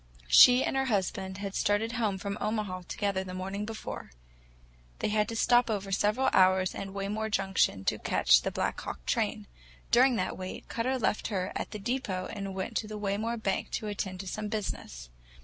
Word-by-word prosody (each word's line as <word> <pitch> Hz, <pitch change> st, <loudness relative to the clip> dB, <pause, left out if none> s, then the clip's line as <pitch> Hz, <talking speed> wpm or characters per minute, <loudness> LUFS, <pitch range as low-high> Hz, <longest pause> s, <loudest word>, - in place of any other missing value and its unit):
She 250 Hz, -, +8 dB
and -, -, -1 dB
her 270 Hz, 0 st, +1 dB
husband 190 Hz, -4 st, -1 dB
had 200 Hz, -1 st, -5 dB
started 205 Hz, +3 st, +1 dB
home 220 Hz, -5 st, 0 dB
from 200 Hz, +1 st, -4 dB
Omaha 210 Hz, -4 st, -2 dB
together 200 Hz, -2 st, -1 dB
the 185 Hz, -1 st, -7 dB
morning 195 Hz, +3 st, -4 dB
before. 220 Hz, 0 st, -6 dB, 0.9 s
They -, -, -1 dB
had 210 Hz, -1 st, +1 dB
to 230 Hz, -, -4 dB
stop 240 Hz, +1 st, +4 dB
over 200 Hz, -2 st, -2 dB
several 210 Hz, +6 st, +2 dB
hours 185 Hz, 0 st, +4 dB
at 195 Hz, -, -5 dB
Waymore 200 Hz, +3 st, -3 dB
Junction 190 Hz, -, +1 dB
to -, -, +1 dB
catch -, -, +4 dB
the -, -, -1 dB
Black -, -, -2 dB
Hawk -, -, -7 dB
train. -, -, -1 dB, 0.5 s
During 255 Hz, +1 st, +5 dB
the 185 Hz, -, -1 dB
wait, 185 Hz, 0 st, -7 dB
Cutter 255 Hz, +3 st, -1 dB
left 220 Hz, -3 st, 0 dB
her 190 Hz, -4 st, -2 dB
at -, -, -3 dB
the -, -, -6 dB
depot 205 Hz, -4 st, -2 dB
and 195 Hz, -3 st, -5 dB
went 190 Hz, +4 st, -4 dB
to 215 Hz, -, -2 dB
the 215 Hz, 0 st, -6 dB
Waymore 210 Hz, +3 st, -1 dB
bank 195 Hz, -, -1 dB
to -, -, -2 dB
attend 195 Hz, -3 st, -4 dB
to 195 Hz, -, -9 dB
some 210 Hz, +3 st, -4 dB
business. 65 Hz, -, -5 dB
205 Hz, 190 wpm, -29 LUFS, 190-220 Hz, 0.9 s, She